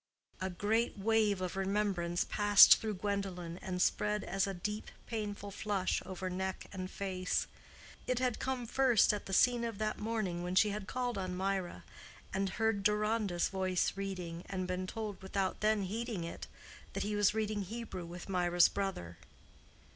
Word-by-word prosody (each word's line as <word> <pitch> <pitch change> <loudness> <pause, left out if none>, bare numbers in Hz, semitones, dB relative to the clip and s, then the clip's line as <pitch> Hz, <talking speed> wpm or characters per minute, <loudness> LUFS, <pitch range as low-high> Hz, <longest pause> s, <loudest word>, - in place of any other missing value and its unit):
A 190 - -1
great 215 +6 0
wave 210 -1 +2
of 185 0 -3
remembrance 195 -3 0
passed 205 -1 +8
through 215 -2 -3
Gwendolen 185 -3 -3
and 180 -1 -4
spread 210 +3 +1
as 195 +1 0
a 195 - -2
deep, 210 +4 -4 0.2
painful 205 -3 -4
flush 200 -2 -1
over 185 0 -4
neck 190 +1 -3
and 185 -1 -4
face. 185 -2 -1 0.6
It 255 - +1
had 250 -2 0
come 260 -2 -2
first 245 -3 +4
at 205 - -4
the - - -6
scene 240 +4 +4
of 230 -3 -3
that 215 0 -2
morning 210 -6 -2
when 180 +1 -3
she 210 +2 +5
had 205 -1 -5
called 245 -3 -2
on 185 -1 -3
Mirah, 190 - -2 0.5
and 195 0 0
heard 220 +1 0
Deronda's 210 -3 +1
voice 185 -1 0
reading, 180 -4 -5
and 185 -2 -2
been 185 0 -2
told, 215 -1 -5
without 190 0 -2
then 215 -1 +2
heeding 215 -1 -3
it, 170 - -6 0.5
that - - -2
he 210 +1 -2
was 205 0 +3
reading 215 -1 -1
Hebrew 200 -3 -6
with 175 +1 -8
Mirah's 175 -2 +4
brother. 90 - -4
195 Hz, 165 wpm, -33 LUFS, 185-215 Hz, 0.6 s, passed